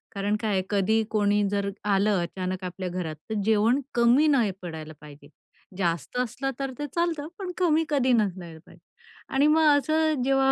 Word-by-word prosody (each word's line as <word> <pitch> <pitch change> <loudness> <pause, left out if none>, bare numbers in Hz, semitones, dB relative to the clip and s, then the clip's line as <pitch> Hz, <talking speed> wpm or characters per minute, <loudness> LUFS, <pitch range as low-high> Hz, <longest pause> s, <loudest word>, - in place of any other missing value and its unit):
कारण 200 +1 0
काय 220 -2 -1
आहे? 190 -2 +1
कधी, 210 +2 +2
कोणी 205 -1 +2
जर 200 0 -1 0.2
आलं 195 -1 +2
अचानक 185 +1 -4
आपल्या 180 0 -5
घरात 175 -3 -4
तर 220 - -2
जेवण 220 +4 +3 0.2
कमी 240 +6 +4
नाही 250 -9 +3
पडायला 160 -3 -7
पाहिजे. 145 -1 -14 0.5
जास्त 170 - -2
असलं 250 +2 -2
तर 270 -1 -2
ते 295 - -2
चालतं 335 -4 -1
पण 375 -2 -4
कमी 325 -3 +2
कधी 270 -4 +2
नसायला 185 -7 -1
पाहिजे. - - -18 0.5
आणि 275 +2 +3
मग 315 +1 +4
असं 310 -1 +1
जेव्हा 270 0 +3
215 Hz, 170 wpm, -26 LUFS, 185-275 Hz, 0.5 s, कमी